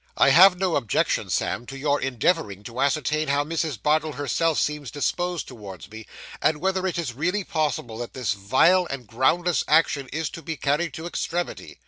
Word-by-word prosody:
'I - - +5
have 185 +1 +7
no 185 -2 +1
objection, 120 -7 0
Sam, 120 - -1
to 135 - -7
your 145 +1 0
endeavouring 125 - 0
to 115 +4 -5
ascertain 155 +2 +1
how 140 +1 +2
Mrs. 155 -5 -2
Bardell 155 +4 +1
herself 155 +3 0
seems 150 -3 -2
disposed 175 +4 -2
towards 105 -7 -10
me, 110 0 -10 0.3
and 155 - +2
whether 190 +1 0
it 180 - -2
is 160 -8 -3
really 180 - -1
probable 135 -9 -2
that 120 - -6
this 120 -8 -1
vile 130 - +3
and 135 -3 -5
groundless 155 +10 +1
action 150 -3 +2
is 160 0 -3
to 165 - -8
be 160 -1 -5
carried 150 +3 -1
to 160 - -7
extremity. 175 0 -4
150 Hz, 180 wpm, -24 LUFS, 130-170 Hz, 0.3 s, have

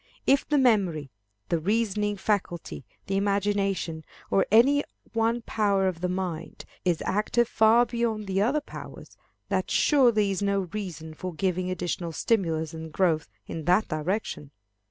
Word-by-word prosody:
If 275 0 +3
the 300 - +3
memory, 190 - +2 0.4
the 170 - +1
reasoning 210 +2 0
faculty, 185 - -2 0.2
the 195 - -1
imagination, 195 -4 0 0.3
or 195 - +3
any 270 +7 +5 0.3
one 230 +1 +1
power 200 -4 +1
of 175 -3 -3
the 180 - 0
mind, 180 -3 -4 0.2
is 175 -3 0
active 215 +4 +1
far 225 +2 +5
beyond 235 -3 -2
the 195 0 0
other 270 +8 +2
powers, - - -10 0.3
that - - 0
surely 235 -8 +4
is 195 - -2
no 200 -1 +1
reason 170 -7 -5
for 180 +2 -6
giving 185 0 -1
additional 175 -2 -3
stimulus 165 -5 0
and 160 0 -7
growth 165 -3 +1 0.2
in 160 -2 -6
that 180 +5 +3
direction. 155 -1 -3
195 Hz, 145 wpm, -27 LUFS, 175-220 Hz, 0.4 s, any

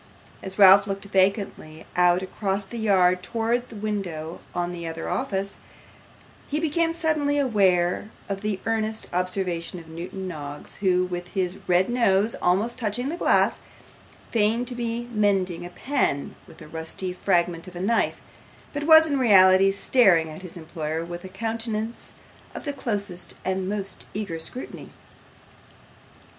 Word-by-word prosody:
As 190 0 -7
Ralph 195 0 +8
looked 195 0 -4
vacantly 190 -5 0
out 180 +1 +4
across 195 +1 -1
the 235 +4 -7
yard 185 -4 +3
towards 235 +4 -1
the 230 - -11
window 190 -6 -4 0.2
of 175 0 -1
the 170 -1 -6
other 165 0 -5
office, 200 -6 -2 0.9
he 295 - -1
became 330 +1 +1
suddenly 310 -3 +1
aware 195 -8 +2 0.2
of 195 -1 -4
the 210 -2 -2
earnest 220 -1 -1
observation 180 -1 -2
of 165 -2 -11
Newman 175 +4 -6
Noggs, 145 -4 -7
who, 185 -2 +2
with 175 -1 -5
his 185 -1 -1
red 180 +1 +3
nose 225 -3 +2
almost 205 +8 +1
touching 240 +3 -1
the 330 - -2
glass, - - +3 0.7
feigned 230 +2 +1
to - - -5
be 240 0 -3
mending 190 -5 +1
a - - -11
pen 240 - -1
with - - -13
a - - -12
rusty 165 +3 -4
fragment 175 -2 0
of 180 - -11
a - - -5
knife, 220 +5 0 0.5
but 290 0 -3
was 320 0 +8
in 285 -3 0
reality 195 -4 +6
staring 195 -6 +4
at 155 - -9
his 180 -1 -9
employer 160 0 -4
with 175 0 -7
a 190 - -8
countenance 225 +2 -4 0.4
of - - -7
the 285 - -2
closest 205 -9 -3
and 190 0 -1
most 200 -1 -4
eager 200 -6 -3
scrutiny. 250 +10 -6
195 Hz, 150 wpm, -25 LUFS, 180-225 Hz, 0.9 s, Ralph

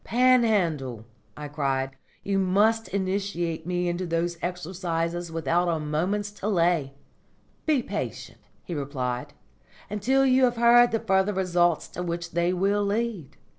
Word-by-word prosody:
"Panhandle," 200 - +2 0.3
I 150 0 -6
cried, 135 -2 -2 0.3
"you 195 -1 0
must 210 +4 +2
initiate 185 -4 -2
me 180 0 -1
into 175 +1 -2
those 170 +1 -1
exercises 175 -1 -3
without 165 +2 0
a 165 -2 0
moment's 180 +8 -1
delay." 175 -9 0 0.7
"Be 290 -6 +2
patient," - - -5 0.2
he 175 - -6
replied, 135 -2 -3 0.6
"until 260 +7 +2
you 260 0 +5
have 245 -1 0
heard 240 +1 +6
the 225 - +1
further 190 +1 +1
results 175 -3 +1
to 180 - -6
which 170 0 -4
they 170 +1 +1
will 200 +3 +1
lead. 200 - -2
180 Hz, 135 wpm, -26 LUFS, 165-205 Hz, 0.7 s, heard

